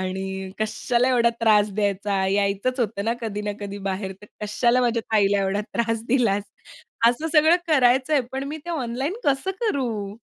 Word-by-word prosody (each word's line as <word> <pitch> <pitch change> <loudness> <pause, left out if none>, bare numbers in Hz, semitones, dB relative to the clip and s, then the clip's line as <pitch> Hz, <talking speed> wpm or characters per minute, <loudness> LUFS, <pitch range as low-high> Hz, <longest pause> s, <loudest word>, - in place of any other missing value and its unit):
आणि 190 0 -4
कशाला 235 +3 0
एवढा 240 -2 +4
त्रास 210 -2 +4
द्यायचा 200 -1 0
यायचंच 200 +6 0
होतं 210 -3 -1
ना 225 - +1
कधी 215 -3 -4
ना 205 0 -2
कधी 200 0 -6
बाहेर, 190 0 -3
तर - - -11 0.2
कशाला 235 +4 +2
माझ्या 235 -2 +1
ताईला 205 -1 +3
एवढा 195 +1 0
त्रास 230 -1 0
दिलास." 230 -6 +2 0.7
असं 245 +7 -1
सगळं 315 +2 +6
करायचंय 265 0 +3
पण 265 +1 -3
मी 300 - -4
ते 345 - -5
ऑनलाईन 270 +1 -2
कसं 280 +6 +1
करू? 230 - -2
225 Hz, 165 wpm, -23 LUFS, 200-255 Hz, 0.7 s, सगळं